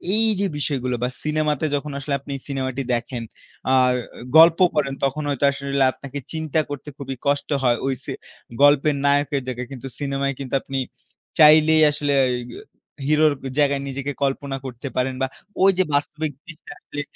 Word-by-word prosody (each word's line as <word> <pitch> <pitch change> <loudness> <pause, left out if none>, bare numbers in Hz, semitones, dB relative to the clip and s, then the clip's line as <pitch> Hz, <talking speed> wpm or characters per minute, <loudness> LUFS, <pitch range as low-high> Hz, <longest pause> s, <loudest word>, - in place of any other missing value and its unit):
এই 225 +1 +4
যে 200 - +1
বিষয়গুলো 130 -4 -1
বা 125 - +1
সিনেমাতে 155 -1 0
যখন 145 +1 -3
আসলে, 140 +1 -3
আপনি 140 +1 -7
সিনেমাটি 135 -1 -3
দেখেন। 120 0 -3 0.5
আ - - +4 0.6
গল্প 165 +1 +8
পড়েন, 140 -2 0
তখন 145 +3 0
হয়তো 140 0 +1
আসলে 140 -1 -1
আপনাকে 140 0 -7
চিন্তা 160 -1 -1
করতে 145 +1 -6
খুবই 135 -2 -5
কষ্ট 140 0 0
হয়, 120 -2 +3
হইসে। 130 -2 -3 0.5
গল্পের 145 +1 +5
নায়কের 140 -1 +2
জায়গায়, 125 -1 -4
কিন্তু 135 0 -7
সিনেমায় 140 -1 -1
কিন্তু 135 -1 -3
আপনি 135 - -4 0.6
চাইলেই 155 +1 +7
আসলে 145 -1 -1 0.2
এগ 125 0 -4 0.6
হিরোর 155 0 +4 0.3
জায়গায় 140 -1 +2
নিজেকে 140 +1 -4
কল্পনা 135 0 -1
করতে 130 +2 -6
পারেন 130 +1 0
বা 130 - +2 0.4
ওই 195 - +7
যে 185 - +4
বাস্তবিক 150 +1 -1
জিনিসটা 165 -3 -11
আসলে, 145 - -6
140 Hz, 155 wpm, -22 LUFS, 135-150 Hz, 0.6 s, গল্প